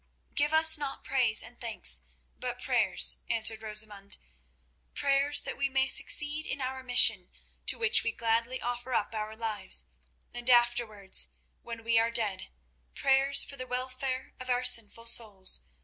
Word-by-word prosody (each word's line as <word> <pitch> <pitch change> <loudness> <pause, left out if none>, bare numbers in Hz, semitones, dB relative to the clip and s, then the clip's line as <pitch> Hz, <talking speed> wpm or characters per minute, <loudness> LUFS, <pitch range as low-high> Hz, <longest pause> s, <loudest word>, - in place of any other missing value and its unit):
"Give 290 +1 0
us 315 0 +6
not 280 -2 -7
praise 245 -5 +1
and 240 - -14
thanks, 230 -2 0 0.4
but - - -6
prayers," - - +2
answered 220 -1 +1
Rosamund; 210 -2 -2 0.8
"prayers 280 +1 +1
that - - -7
we 275 0 -1
may 265 0 0
succeed 295 +3 +1
in - - -5
our 260 0 -5
mission, 245 -7 +6 0.4
to - - +4
which 455 0 +3
we 230 - -2
gladly 230 +3 -2
offer 245 +1 -5
up 210 - -2
our 215 0 -6
lives, 220 -3 +1 0.4
and 240 +1 -3
afterwards, 240 -5 +2 0.3
when 230 -1 -9
we 230 0 +2
are 230 +1 0
dead, 215 -5 -3 0.5
prayers 275 +1 +2
for 280 - -10
the 255 -1 -8
welfare 255 +1 -5
of 255 0 -8
our 250 0 0
sinful 230 -2 +2
souls. 200 - 0
240 Hz, 150 wpm, -28 LUFS, 220-265 Hz, 0.8 s, us